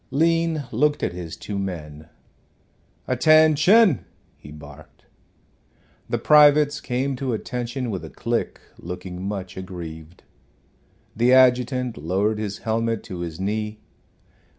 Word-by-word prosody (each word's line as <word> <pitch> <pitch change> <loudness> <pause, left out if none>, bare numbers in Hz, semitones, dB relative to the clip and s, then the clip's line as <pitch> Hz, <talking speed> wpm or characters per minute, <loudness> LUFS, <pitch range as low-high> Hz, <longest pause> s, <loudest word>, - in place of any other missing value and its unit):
Lean 165 0 +1
looked 150 0 +1
at - - -1
his 85 -2 -7
two 100 -1 -5
men. 80 -5 -6 1.0
"Attention," 155 - +4 0.3
he 75 - -14
barked. 75 0 -14 1.0
The - - 0
privates 150 0 +5
came 130 +2 -2
to 130 -2 -2
attention 120 +2 -4
with 95 - -5
a - - -8
click, - - -3 0.2
looking 90 +1 -7
much 95 -2 -5
aggrieved. 85 -3 -9 0.9
The 120 +3 +3
adjutant 125 -1 +3
lowered 100 +7 -1
his 105 -1 -4
helmet 115 0 -1
to 90 - -8
his 85 -1 -6
knee. 105 +2 -3
110 Hz, 115 wpm, -23 LUFS, 90-135 Hz, 1.0 s, privates